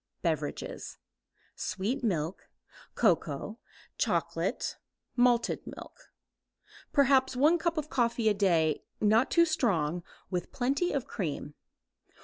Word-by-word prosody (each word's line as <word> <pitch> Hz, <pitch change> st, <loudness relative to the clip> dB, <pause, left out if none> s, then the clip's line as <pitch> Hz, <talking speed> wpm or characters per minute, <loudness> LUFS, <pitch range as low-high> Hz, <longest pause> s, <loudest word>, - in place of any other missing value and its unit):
Beverages. -, -, -3 dB, 0.6 s
Sweet 235 Hz, +8 st, -2 dB
milk, 175 Hz, -5 st, -2 dB, 0.5 s
cocoa, 185 Hz, 0 st, +1 dB, 0.4 s
chocolate, -, -, -1 dB, 0.4 s
malted 245 Hz, -1 st, +2 dB
milk. -, -, -11 dB, 0.8 s
Perhaps 265 Hz, -2 st, +4 dB
one 305 Hz, +7 st, +4 dB
cup 335 Hz, 0 st, 0 dB
of 305 Hz, 0 st, -3 dB
coffee 235 Hz, -2 st, +1 dB
a 215 Hz, -, +5 dB
day, 170 Hz, -6 st, +2 dB, 0.2 s
not 220 Hz, +3 st, +4 dB
too 335 Hz, 0 st, +5 dB
strong, 180 Hz, -, +1 dB, 0.3 s
with 180 Hz, -2 st, -3 dB
plenty 275 Hz, +7 st, 0 dB
of 275 Hz, -3 st, -1 dB
cream. 150 Hz, -6 st, -4 dB
235 Hz, 105 wpm, -30 LUFS, 180-275 Hz, 0.8 s, a